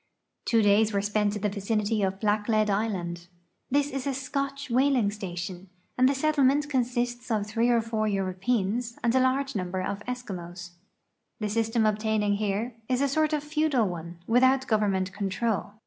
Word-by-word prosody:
'I'wo 225 -2 +4
days 210 +2 +4
were 200 - +1
spent 210 0 +1
in 210 - -5
the 210 - +2
vicinity 210 +2 -1
of 190 -1 0
F>hicklea(l 215 0 +2
island. 180 -5 -2 0.4
This 285 +2 +1
is 270 +1 -3
a 275 - -1
Scotch 275 0 -3
whal 270 +3 +3
ing 210 -5 +2
station, 185 -2 -6 0.3
and 255 +1 +4
the 280 - +1
settlement 290 0 +2
consists 245 -1 -1
of 215 -3 0
three 225 +3 +1
or 235 -1 +4
four 220 -1 -1
Euro|»eans 205 +4 -1
and 235 -1 +2
a 260 - +4
large 265 +2 +1
numher 185 -1 -2
of 200 - -3
P^skimos. 185 -7 -6 0.7
The 210 -1 -2
system 225 +1 +1
ohtaining 215 -1 +1
here 215 +3 -1 0.2
is 255 -1 +1
a 280 - +3
sort 310 +3 +1
of 300 -2 0
feudal 300 -6 +1
one, 170 -1 -6
without 260 +4 +4
government 200 -5 +1
control. 205 +1 -2
220 Hz, 170 wpm, -27 LUFS, 200-255 Hz, 0.7 s, I'wo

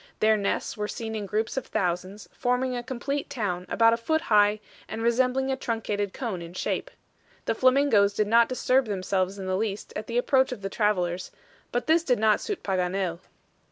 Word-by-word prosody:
Their 220 0 +4
nests 200 -2 -1
were 210 -1 -3
seen 220 +1 -5
in 210 -2 -4
groups 220 +5 -2
of 265 - -2
thousands, 185 +3 -2
forming 250 +1 0
a 245 - -2
complete 265 +3 -3
town, 180 -6 -3
about 230 0 +4
a - - +1
foot 315 +7 0
high, 210 -4 +4 0.3
and 225 +1 -5
resembling 255 +3 +2
a - - +1
truncated 215 -5 -2
cone 215 -8 -4
in 170 +1 -9
shape. - - -2 0.6
The - - +1
flamingos 255 -5 +4
did 215 - +2
not 230 +2 +4
disturb 255 +1 +2
themselves 190 -1 -1
in 195 - -6
the 185 0 0
least 205 0 -3
at 215 - -5
the 235 - -2
approach 260 +1 +3
of 225 -6 -6
the 195 - -2
travelers, 185 -4 0 0.4
but 245 0 -1
this 325 +1 +3
did 250 -6 +2
not 215 -1 +3
suit 415 -3 -4
Paganel. 185 -2 -1
220 Hz, 190 wpm, -26 LUFS, 195-250 Hz, 0.6 s, Their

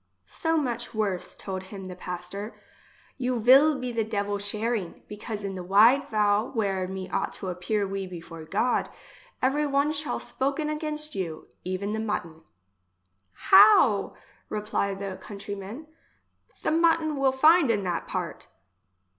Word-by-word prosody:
— - - -47
So 325 0 -1
much 240 -6 -2
worse, 200 -4 -2
told 190 -1 -5
him 190 0 -9
the 180 - -7
pas 180 -1 -6
tor; 200 +4 -6 0.6
you 250 -1 0
vill 270 +6 +6
be 255 -1 -4
the 230 -1 0
devil 205 -2 -2
sharing; 210 -1 -2
because 210 0 -6
in 195 -1 -3
the 185 - -5
wide 220 +9 +5
vale 210 +1 +2
where 195 -6 -1
me 190 0 -5
ought - - -1
to 190 - -6
appear 195 +3 -1
we 195 0 -4
before 165 -2 -9
God 215 +9 0 0.5
every 290 +3 +2
one 280 +1 +2
shall 300 0 -2
spoken 280 +3 -1
against 305 0 -2
you, 170 -7 -5
even 185 +3 -3
the 220 - -2
mutton. 170 -7 -3 1.1
How! 385 - +7 0.3
repply 210 -2 -1
the 195 -1 -6
country 200 -1 -7
man, 200 +10 -8 0.8
the - - +1
mutton 325 -1 +3
will 275 -1 +2
find 310 +2 +5
in 205 -3 +1
that 175 -2 -2
part - - -4
210 Hz, 155 wpm, -27 LUFS, 195-275 Hz, 1.1 s, How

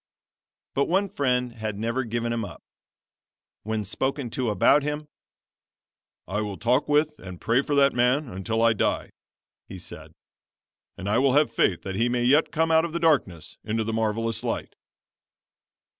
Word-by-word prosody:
But 140 - +2
one 195 +3 +1
friend 125 -5 0
had 110 -3 -5
never 115 +4 -1
given 120 0 -2
him 115 -1 -2
up. 90 -6 -9 1.0
When 110 0 -2
spoken 130 +4 -3
to 125 -1 -1
about 105 +8 +4
him 150 +1 -4 1.2
"I 105 +4 -2
will 105 -2 -4
talk 125 +6 +1
with 150 +1 +2
and 90 -2 -9
pray 115 +4 +2
for 145 +1 -2
that 140 0 +4
man 125 +4 +2
until 110 +3 -2
I 115 -1 +5
die," 105 - -1 0.6
he - - -7
said; - - -11 0.8
"and 95 - -6
I 105 +4 +2
will 135 -1 +3
have 145 -5 +3
faith 95 -6 +1
that 95 - -4
he 115 +5 +1
may 120 0 0
yet 145 +6 +4
come 165 +1 +1
out 160 0 +5
of 170 0 -3
darkness 135 - 0
into 110 +1 -1
the 110 +1 -3
marvelous 115 +1 -1
light." - - -3
120 Hz, 165 wpm, -25 LUFS, 110-140 Hz, 1.2 s, I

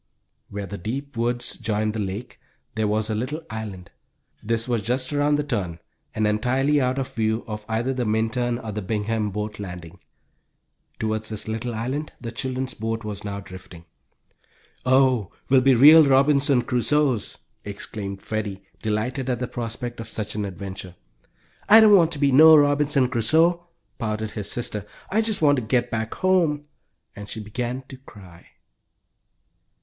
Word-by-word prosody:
Where 100 0 -5
the 100 +1 -7
deep 135 +9 -5
woods 120 +1 -1
joined 110 -1 -1
the 110 - -4
lake 100 +4 -5 0.3
there 110 -1 0
was 105 +1 0
a 110 - -2
little 130 +9 -3
island. 105 -5 -7 0.5
This 115 +2 -1
was 120 -3 0
just 130 +6 -2
around 145 0 +2
the 150 - 0
turn, 100 - -3 0.4
and 110 - +1
entirely 130 +7 +2
out 130 +1 0
of 135 -1 -3
view 110 0 0
of 105 -2 -6
either 115 +4 0
the 125 -1 -2
Minturn 115 +2 0
or 115 -3 -6
the 105 +1 -4
Bingham 105 +2 -1
boat 105 +1 -5
landing. 90 -2 -8 1.0
Toward 110 0 -2
this 110 -1 -5
little 115 +2 -3
island 130 +7 -3
the 115 -2 -6
children's 130 +2 -3
boat 115 +1 -3
was 105 -1 -6
now 100 -1 -5
drifting. 95 -3 -12 1.0
"Oh, 130 -6 +3 0.2
we'll 130 -1 +5
be 135 0 +5
real 155 +6 +9
Robinson 140 -1 +4
Crusoes!" 130 -1 0 0.3
exclaimed 100 -1 -6
Freddie, 105 -3 -4 0.2
delighted 120 +5 -2
at 125 - 0
the 125 - -3
prospect 120 0 -5
of 115 -1 -6
such 105 -1 -3
an 105 -1 -2
adventure. 95 -1 -7 0.7
"I 220 +2 +10
don't 215 -2 +7
want 170 -3 +4
to - - -4
be 140 -1 +2
no 155 +4 +9
Robinson 145 -2 +3
Crusoe!" 160 +9 +2 0.3
pouted 110 -1 -3
his 105 -1 -4
sister. 105 -4 -3 0.3
"I 215 +3 +3
just 220 -6 +1
want 145 -1 +5
to - - 0
get 120 +2 0
back 110 -1 -3
home," 170 -6 +1 0.5
and 105 0 -9
she - - -5
began 120 +4 -4
to 135 - -9
cry. 95 -9 -15
115 Hz, 165 wpm, -24 LUFS, 105-135 Hz, 1.0 s, I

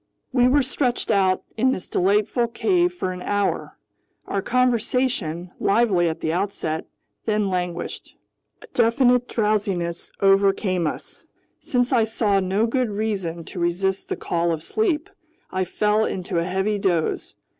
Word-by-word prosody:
We 250 -1 +5
were 280 +2 +4
stretched 250 -3 -1
out 190 -3 +2
in 260 +3 +3
this 185 - -6
delightful 210 +5 +2
cave 355 - +1
for 270 - -3
an 180 - -8
hour. 205 +1 -1 0.5
Our 200 - -1
conversation, 240 -7 0
lively 195 -5 +3
at 160 - -5
the 160 - -1
outset, 175 -4 -2 0.4
then 210 -2 +1
languished. 180 -1 -4 0.5
A - - -12
definite 245 +1 +3
drowsiness 200 -6 -1
overcame 195 -3 +3
us. - - -7 0.4
Since 245 0 0
I 230 -3 +4
saw 215 -3 +1
no 195 +4 +1
good 250 0 0
reason 200 -6 -2
to 180 - -8
resist 185 +3 -1
the - - -1
call 170 0 0
of 160 -1 -3
sleep, 335 - 0 0.4
I 185 0 0
fell 210 +4 +1
into 180 -2 -2
a 170 - -1
heavy 190 +3 0
doze. 175 -5 -1
200 Hz, 145 wpm, -23 LUFS, 180-240 Hz, 0.5 s, We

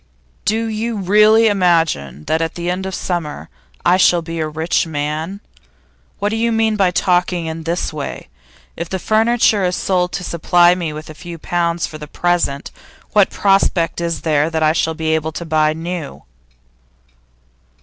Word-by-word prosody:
'Do 225 +2 +1
you 225 +1 -3
really 210 +3 +5
imagine 165 - +1
that 160 - 0
at 165 0 -2
the 175 0 -2
end 190 +1 -3
of 190 - -5
the - - -5
summer 170 -5 -4 0.4
I 180 +1 +5
shall 175 -2 +4
be 165 0 -5
a 155 - -1
rich 160 +2 0
man? 155 +5 -3 0.8
What 205 +1 -1
do 220 - -2
you 230 +1 +1
mean 225 -1 +1
by 195 -3 +3
talking 180 -1 +1
in 160 0 -5
this 170 -1 -2
way? 145 -2 -6 0.5
If 170 0 -5
the 190 - -2
furniture 220 +1 +2
is 180 0 +1
sold 180 -2 0
to 190 - -3
supply 175 +1 +3
me 175 -3 -3
with 155 +1 -8
a - - -9
few 170 +2 -9
pounds 170 0 -1
for 155 - -9
the 150 - -8
present, 170 -4 -1 0.4
what 205 -2 +4
prospect 195 -4 +1
is 170 -1 -2
there 150 -1 +1
that 160 -1 -1
I 155 0 +4
shall 160 0 0
be 160 0 -1
able 160 0 -1
to 170 - -5
buy 155 -1 +2
new? 165 -1 -6
175 Hz, 180 wpm, -18 LUFS, 160-190 Hz, 0.8 s, really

